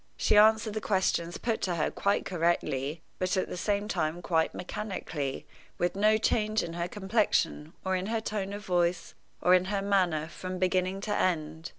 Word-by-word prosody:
She -, -, +2 dB
answered 215 Hz, +1 st, +5 dB
the 215 Hz, -, -3 dB
questions 185 Hz, -4 st, 0 dB
put 230 Hz, -2 st, -2 dB
to 180 Hz, -2 st, 0 dB
her 155 Hz, -, 0 dB
quite 200 Hz, 0 st, 0 dB
correctly, 165 Hz, -4 st, -1 dB, 0.2 s
but 185 Hz, +1 st, 0 dB
at 185 Hz, -, 0 dB
the -, -, -4 dB
same 205 Hz, +3 st, -1 dB
time 170 Hz, -5 st, -2 dB
quite 160 Hz, -2 st, +1 dB
mechanically, 180 Hz, -8 st, -4 dB, 0.3 s
with 175 Hz, +1 st, 0 dB
no 215 Hz, +2 st, +4 dB
change 215 Hz, 0 st, +1 dB
in 165 Hz, -, -5 dB
her 170 Hz, 0 st, -2 dB
complexion, 190 Hz, -6 st, 0 dB
or 190 Hz, 0 st, +1 dB
in 185 Hz, +1 st, -2 dB
her 225 Hz, +1 st, 0 dB
tone 210 Hz, -3 st, -3 dB
of 205 Hz, 0 st, -7 dB
voice, 175 Hz, -1 st, 0 dB, 0.3 s
or 180 Hz, -, +5 dB
in 185 Hz, 0 st, +5 dB
her 195 Hz, 0 st, -1 dB
manner, 180 Hz, -6 st, +1 dB
from 185 Hz, +2 st, -6 dB
beginning 185 Hz, +1 st, 0 dB
to 205 Hz, -, -1 dB
end. 160 Hz, -2 st, -1 dB
185 Hz, 185 wpm, -29 LUFS, 170-205 Hz, 0.3 s, answered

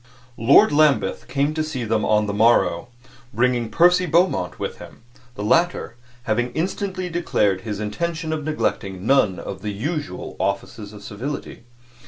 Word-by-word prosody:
Lord 140 Hz, -, +6 dB
Lambeth 150 Hz, -1 st, +2 dB
came 140 Hz, +3 st, 0 dB
to 155 Hz, 0 st, -1 dB
see 150 Hz, -6 st, -4 dB
them 110 Hz, -1 st, 0 dB
on 105 Hz, 0 st, +2 dB
the 100 Hz, -, -3 dB
morrow, 105 Hz, -5 st, +3 dB, 0.4 s
bringing 120 Hz, 0 st, +1 dB
Percy 180 Hz, +4 st, +4 dB
Beaumont 170 Hz, -, +1 dB
with -, -, -5 dB
him -, -, -13 dB, 0.3 s
the 105 Hz, -, -5 dB
latter 165 Hz, 0 st, +1 dB, 0.3 s
having 120 Hz, +1 st, 0 dB
instantly 185 Hz, +2 st, -2 dB
declared 105 Hz, -, 0 dB
his 105 Hz, 0 st, -5 dB
intention 160 Hz, +9 st, -3 dB
of 155 Hz, -1 st, -3 dB
neglecting 100 Hz, -11 st, -2 dB
none 115 Hz, -8 st, +3 dB
of 95 Hz, -1 st, -7 dB
the 105 Hz, -, -4 dB
usual 145 Hz, +9 st, -4 dB
offices 105 Hz, -1 st, -3 dB
of 105 Hz, -1 st, -12 dB
civility. 125 Hz, +3 st, -6 dB
125 Hz, 150 wpm, -22 LUFS, 105-160 Hz, 0.4 s, Lord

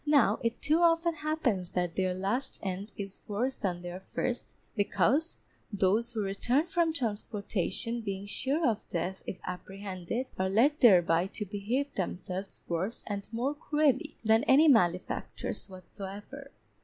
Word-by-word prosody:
Now 295 Hz, -2 st, +4 dB
it 230 Hz, +1 st, -1 dB
too 310 Hz, +3 st, +3 dB
often 335 Hz, 0 st, +4 dB
happens 295 Hz, -, -1 dB
that 180 Hz, -2 st, -1 dB
their 185 Hz, -1 st, +1 dB
last 200 Hz, +8 st, -1 dB
end 195 Hz, +2 st, -3 dB
is 200 Hz, -1 st, -6 dB
worse 240 Hz, +6 st, -1 dB
than 180 Hz, -4 st, -3 dB
their 175 Hz, +1 st, -5 dB
first, 245 Hz, +5 st, -3 dB, 0.2 s
because 230 Hz, -, +2 dB, 0.3 s
those 205 Hz, +4 st, +2 dB
who 220 Hz, -3 st, -1 dB
return 240 Hz, +9 st, +1 dB
from 345 Hz, -2 st, +1 dB
transportation 225 Hz, -, -1 dB
being 200 Hz, -2 st, -4 dB
sure 270 Hz, +9 st, 0 dB
of 220 Hz, -3 st, +1 dB
death 180 Hz, +2 st, -2 dB
if 190 Hz, -, -4 dB
apprehended, 190 Hz, +5 st, -5 dB
are 190 Hz, 0 st, +1 dB
led 270 Hz, +10 st, +3 dB
thereby 175 Hz, -, +6 dB
to 210 Hz, +2 st, -5 dB
behave 225 Hz, +9 st, -2 dB
themselves 185 Hz, +1 st, -4 dB
worse 180 Hz, +7 st, -2 dB
and 200 Hz, -1 st, -4 dB
more 245 Hz, +5 st, 0 dB
cruelly 300 Hz, 0 st, +1 dB
than 220 Hz, 0 st, +4 dB
any 290 Hz, +5 st, +6 dB
malefactors, 185 Hz, -, +1 dB
whatsoever. 200 Hz, +8 st, -9 dB
210 Hz, 145 wpm, -30 LUFS, 190-270 Hz, 0.3 s, thereby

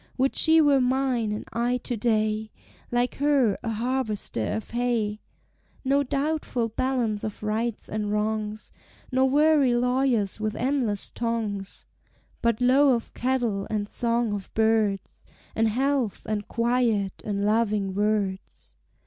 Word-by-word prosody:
"Would 270 Hz, +1 st, +1 dB
she 320 Hz, 0 st, +6 dB
were 285 Hz, -3 st, +4 dB
mine, 250 Hz, -3 st, +1 dB
and 210 Hz, -, -4 dB
I 240 Hz, +2 st, +1 dB
to 245 Hz, -, -2 dB
day, 215 Hz, -1 st, 0 dB, 0.4 s
Like 245 Hz, +1 st, 0 dB
her, 275 Hz, -7 st, +3 dB
a 230 Hz, -, -4 dB
harvester 225 Hz, -, -1 dB
of 220 Hz, -, -5 dB
hay. 230 Hz, -3 st, -1 dB, 0.6 s
"No 275 Hz, +2 st, +3 dB
doubtful 280 Hz, -4 st, -1 dB
balance 235 Hz, -3 st, -1 dB
of 215 Hz, 0 st, -5 dB
rights 220 Hz, +1 st, -2 dB
and 210 Hz, -1 st, -3 dB
wrongs, 215 Hz, 0 st, -2 dB, 0.4 s
Nor 260 Hz, +1 st, +3 dB
weary 290 Hz, -3 st, +4 dB
lawyers 250 Hz, -4 st, +1 dB
with 215 Hz, 0 st, -2 dB
endless 245 Hz, -6 st, -1 dB
tongues, 220 Hz, -4 st, -3 dB, 0.6 s
"But 235 Hz, -2 st, +1 dB
low 260 Hz, +2 st, +5 dB
of 230 Hz, -, -6 dB
cattle, 240 Hz, -6 st, -1 dB
and 210 Hz, -2 st, -2 dB
song 235 Hz, -1 st, 0 dB
of 200 Hz, -2 st, -6 dB
birds, 220 Hz, -3 st, +1 dB, 0.3 s
And 225 Hz, 0 st, +2 dB
health, 260 Hz, 0 st, 0 dB
and 210 Hz, -1 st, -3 dB
quiet, 230 Hz, -4 st, 0 dB
and 200 Hz, -1 st, -2 dB
loving 210 Hz, -3 st, +1 dB
words." 205 Hz, -2 st, -2 dB
230 Hz, 130 wpm, -25 LUFS, 210-255 Hz, 0.6 s, she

